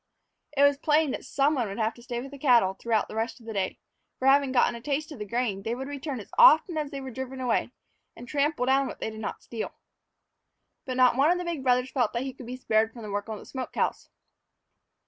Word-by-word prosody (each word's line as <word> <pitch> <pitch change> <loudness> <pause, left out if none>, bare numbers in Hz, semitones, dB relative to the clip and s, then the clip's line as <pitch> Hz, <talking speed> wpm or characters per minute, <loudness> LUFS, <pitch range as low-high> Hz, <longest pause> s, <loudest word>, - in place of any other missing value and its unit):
It 280 - +5
was 285 0 +4
plain 305 -1 +3
that - - -5
some 280 +3 +2
one 250 -6 0
would 195 - -6
have 220 0 0
to 240 - -16
stay 240 0 -4
with 270 +2 -9
the 280 - -10
cattle 240 -9 +4
throughout 220 +1 0
the - - -10
rest 225 +3 -2
of 230 - -17
the 225 - -6
day; 190 -2 -2 0.4
for, 260 - -1
having 275 0 +5
gotten 245 -1 +3
a 235 - -8
taste 295 +4 -2
of 290 - -9
the 210 - -5
grain, 230 -3 -1
they 225 +4 -2
would 265 +2 -5
return 285 -2 -5
as 205 - -11
often 345 -8 +7
as 300 -2 -2
they 280 -2 -6
were 265 -1 -7
driven 265 +1 -6
away 245 -2 0 0.5
and 245 - -11
trample 285 -1 0
down 270 +1 +3
what - - -8
they 220 - -3
did 220 - -9
not 220 - -5
steal. 225 -2 -5 1.1
But 255 -1 -3
not 250 -1 +5
one 280 +3 +5
of 355 - +3
the 360 - -4
big 335 -5 -3
brothers 250 0 +2
felt 245 -5 0
that 235 +1 -1
he 265 -1 -5
could 250 -2 -11
be 250 +1 -5
spared 220 -3 +1
from 235 - -10
the 210 - -6
work 205 +2 -3
on 215 - -4
the - - -12
smoke 260 -2 -6
house. - - -1
255 Hz, 260 wpm, -27 LUFS, 230-280 Hz, 1.1 s, often